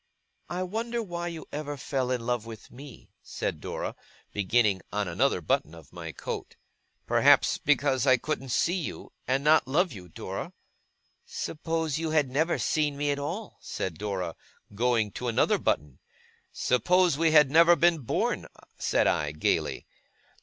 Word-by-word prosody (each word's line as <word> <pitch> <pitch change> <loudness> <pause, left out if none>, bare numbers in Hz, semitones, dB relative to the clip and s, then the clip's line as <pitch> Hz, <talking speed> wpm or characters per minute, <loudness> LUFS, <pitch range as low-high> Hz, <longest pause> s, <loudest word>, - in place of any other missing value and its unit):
'I 180 +1 -2
wonder 230 +5 -2
why 175 -3 -4
you 165 -2 -6
ever 145 -1 -4
fell 130 -1 -2
in 125 -2 -1
love 120 -2 -1
with 110 -1 -10
me?' 135 -1 -12
said - - -4
Dora, - - -4 0.4
beginning 105 -1 +2
on 105 -1 -1
another 90 +3 +1
button 80 0 0
of 80 -3 -15
my 85 -2 -6
coat. - - -6 0.5
'Perhaps - - +4
because 140 -1 +2
I 130 -1 +6
couldn't 135 0 -4
see 165 +7 +2
you, - - -7
and 135 +2 +1
not 150 -2 +5
love 170 +7 +2
you, 90 -4 -11
Dora!' - - -6 0.7
'Suppose 160 -1 -3
you 165 -1 -2
had 150 -4 +2
never 160 +6 +1
seen 150 -2 0
me 145 0 0
at 145 - -2
all,' 180 +9 -5
said 85 -4 -4
Dora, 95 -5 -3 0.4
going 115 -1 +1
to 125 - -5
another 115 - +2
button. 70 -2 -1 0.5
'Suppose 175 +7 +2
we 165 -1 +4
had 150 -3 +6
never 170 +2 +7
been 170 -1 +3
born!' 125 - -1 0.3
said - - +2
I, 75 -2 +1
gaily. 75 - -1
135 Hz, 155 wpm, -28 LUFS, 110-160 Hz, 0.7 s, never